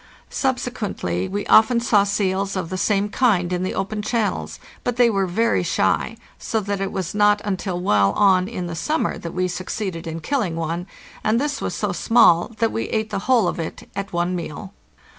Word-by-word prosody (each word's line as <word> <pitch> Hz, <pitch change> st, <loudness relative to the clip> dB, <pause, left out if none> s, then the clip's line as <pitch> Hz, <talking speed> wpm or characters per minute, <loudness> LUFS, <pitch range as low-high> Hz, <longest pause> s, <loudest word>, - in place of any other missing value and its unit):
Subsequently 230 Hz, -, -2 dB
we 205 Hz, +1 st, -3 dB
often 235 Hz, +2 st, +5 dB
saw 215 Hz, -4 st, +3 dB
seals 195 Hz, -1 st, -1 dB
of 185 Hz, -2 st, -3 dB
the -, -, -2 dB
same 200 Hz, +2 st, +1 dB
kind 205 Hz, -6 st, +1 dB
in 180 Hz, -, -1 dB
the 185 Hz, -, -2 dB
open 205 Hz, +2 st, -2 dB
channels, 215 Hz, 0 st, -2 dB, 0.2 s
but 245 Hz, -, -1 dB
they 240 Hz, -1 st, +4 dB
were 195 Hz, -2 st, 0 dB
very 225 Hz, +6 st, +1 dB
shy, -, -, 0 dB, 0.2 s
so 225 Hz, -, -1 dB
that 200 Hz, -1 st, -3 dB
it 195 Hz, 0 st, -2 dB
was 185 Hz, -2 st, -3 dB
not 205 Hz, 0 st, +4 dB
until 190 Hz, -2 st, -2 dB
well 105 Hz, -, +3 dB
on 190 Hz, -, +4 dB
in 185 Hz, -5 st, -4 dB
the 170 Hz, -, -5 dB
summer 305 Hz, -, -1 dB
that 170 Hz, 0 st, -7 dB
we 185 Hz, 0 st, +1 dB
succeeded 180 Hz, -1 st, -4 dB
in 165 Hz, 0 st, -4 dB
killing 205 Hz, -, -1 dB
one, 165 Hz, +2 st, -3 dB, 0.4 s
and 220 Hz, +2 st, +2 dB
this 290 Hz, +1 st, -2 dB
was -, -, -3 dB
so -, -, -1 dB
small 225 Hz, -8 st, +4 dB
that 225 Hz, +1 st, +1 dB
we 225 Hz, -, -2 dB
ate 220 Hz, -1 st, -2 dB
the -, -, -1 dB
whole 235 Hz, -7 st, +4 dB
of -, -, -2 dB
it 165 Hz, -, -6 dB
at 200 Hz, 0 st, -4 dB
one 175 Hz, +1 st, 0 dB
meal. 180 Hz, +3 st, -6 dB
195 Hz, 200 wpm, -22 LUFS, 175-220 Hz, 0.4 s, often